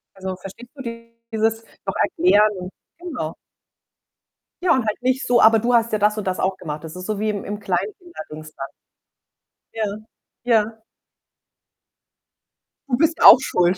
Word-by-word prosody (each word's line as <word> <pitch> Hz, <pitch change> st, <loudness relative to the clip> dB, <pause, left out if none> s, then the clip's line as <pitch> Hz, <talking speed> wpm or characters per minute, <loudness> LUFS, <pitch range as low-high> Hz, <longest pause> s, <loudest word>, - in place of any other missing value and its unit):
Also, 190 Hz, -1 st, -5 dB
verstehst 195 Hz, +6 st, -11 dB
du 275 Hz, -, -8 dB, 0.5 s
dieses 225 Hz, 0 st, 0 dB, 0.2 s
noch -, -, -3 dB
erklären? 210 Hz, -, +2 dB, 0.3 s
Genau. 260 Hz, -, -5 dB, 1.3 s
Ja, 360 Hz, -, +2 dB
und 255 Hz, -3 st, +1 dB
halt 215 Hz, -, -2 dB
nicht 260 Hz, +1 st, 0 dB
so: 240 Hz, -1 st, +4 dB
„Aber 225 Hz, 0 st, +6 dB
du 240 Hz, +3 st, 0 dB
hast 230 Hz, -1 st, +3 dB
ja 215 Hz, -, +1 dB
das 210 Hz, +1 st, +2 dB
und 215 Hz, -, -3 dB
das 185 Hz, -1 st, -2 dB
auch 190 Hz, 0 st, 0 dB
gemacht.“ 150 Hz, -3 st, -6 dB
Das 160 Hz, 0 st, -8 dB
ist 185 Hz, 0 st, -7 dB
so 215 Hz, -1 st, -3 dB
wie 215 Hz, +1 st, 0 dB
im 205 Hz, -2 st, -3 dB
im 205 Hz, +1 st, -5 dB
Kleinkinder-Dingsda. 175 Hz, -, -5 dB, 1.1 s
Ja. 210 Hz, -2 st, -2 dB, 0.5 s
Ja. 225 Hz, -2 st, +1 dB, 2.1 s
„Du 245 Hz, -, +1 dB
bist 325 Hz, +3 st, +1 dB
auch -, -, +11 dB
schuld.“ 180 Hz, -7 st, +1 dB
215 Hz, 150 wpm, -21 LUFS, 185-240 Hz, 2.1 s, auch